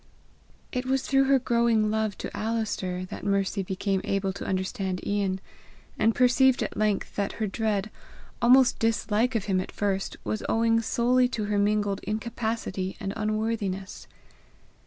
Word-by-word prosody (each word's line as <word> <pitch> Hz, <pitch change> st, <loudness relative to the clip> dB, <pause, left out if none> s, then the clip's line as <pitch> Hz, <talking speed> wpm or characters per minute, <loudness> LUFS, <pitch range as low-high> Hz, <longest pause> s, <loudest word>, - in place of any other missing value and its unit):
It 250 Hz, 0 st, -3 dB
was 265 Hz, 0 st, +1 dB
through 270 Hz, 0 st, +3 dB
her 275 Hz, 0 st, +5 dB
growing 235 Hz, -3 st, +2 dB
love 220 Hz, -2 st, -1 dB
to -, -, -6 dB
Alister 210 Hz, -5 st, -2 dB
that -, -, -7 dB
Mercy 200 Hz, 0 st, 0 dB
became 190 Hz, +1 st, -1 dB
able 195 Hz, -1 st, -1 dB
to -, -, -7 dB
understand 190 Hz, 0 st, -2 dB
Ian, 200 Hz, -2 st, 0 dB, 0.6 s
and 225 Hz, 0 st, +3 dB
perceived 255 Hz, +1 st, +4 dB
at -, -, -5 dB
length 210 Hz, -2 st, 0 dB
that 200 Hz, -1 st, -1 dB
her 220 Hz, -, -2 dB
dread, 210 Hz, 0 st, -1 dB, 0.5 s
almost 250 Hz, +1 st, +5 dB
dislike 225 Hz, +1 st, +1 dB
of 215 Hz, -, 0 dB
him 190 Hz, -2 st, +1 dB
at -, -, -7 dB
first, 195 Hz, -2 st, -2 dB
was 215 Hz, -, -2 dB
owing 230 Hz, 0 st, +3 dB
solely 245 Hz, +2 st, +2 dB
to 235 Hz, -3 st, -3 dB
her 205 Hz, 0 st, 0 dB
mingled 205 Hz, -1 st, +1 dB
incapacity 220 Hz, -3 st, -3 dB
and 195 Hz, -, -3 dB
unworthiness. 215 Hz, -3 st, -2 dB
215 Hz, 150 wpm, -27 LUFS, 195-230 Hz, 0.6 s, her